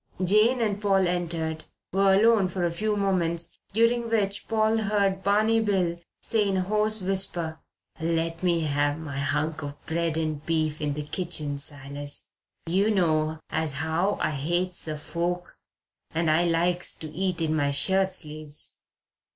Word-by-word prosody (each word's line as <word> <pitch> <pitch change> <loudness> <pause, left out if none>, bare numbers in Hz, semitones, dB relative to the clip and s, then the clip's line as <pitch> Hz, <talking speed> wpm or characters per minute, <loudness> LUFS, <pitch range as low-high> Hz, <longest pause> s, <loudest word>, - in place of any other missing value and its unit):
Jane 215 +7 +4
and 205 -2 0
Paul 195 -3 +3
entered; 165 -3 -2 0.3
were 195 0 +4
alone 215 -1 +5
for 180 0 -3
a 170 - 0
few 210 +4 -1
moments, 175 -4 0 0.2
during 230 +2 +2
which 205 -3 0
Paul 220 0 +2
heard 200 -3 +1
Barney 215 +3 +3
Bill 185 -6 0 0.2
say 215 -3 +1
in 195 -1 +1
a - - +2
hoarse 215 +2 +1
whisper: 180 -4 -1 0.4
"Let 165 0 -1
me 175 -2 +2
have 145 -1 +1
my 145 -4 -5
hunk 150 +2 -1
of 145 0 -7
bread 165 -1 -1
and 155 -2 -2
beef 155 -2 -1
in 145 -1 -1
the 150 - -3
kitchen, 150 -3 -3
Silas. 145 0 -3 0.3
You 190 +5 +2
know 160 -5 +1
as 160 -2 -1
how 160 +7 0
I 155 - 0
hates 175 +5 -2
a 155 -1 -3
fork 175 +3 -3 0.5
and 165 -1 +1
I 165 +3 +3
likes 175 +1 +1
to 160 - -8
eat 185 +1 -1
in 160 -1 0
my 145 -2 +2
shirt 190 +7 +3
sleeves." 150 -1 -5
170 Hz, 160 wpm, -26 LUFS, 155-195 Hz, 0.5 s, alone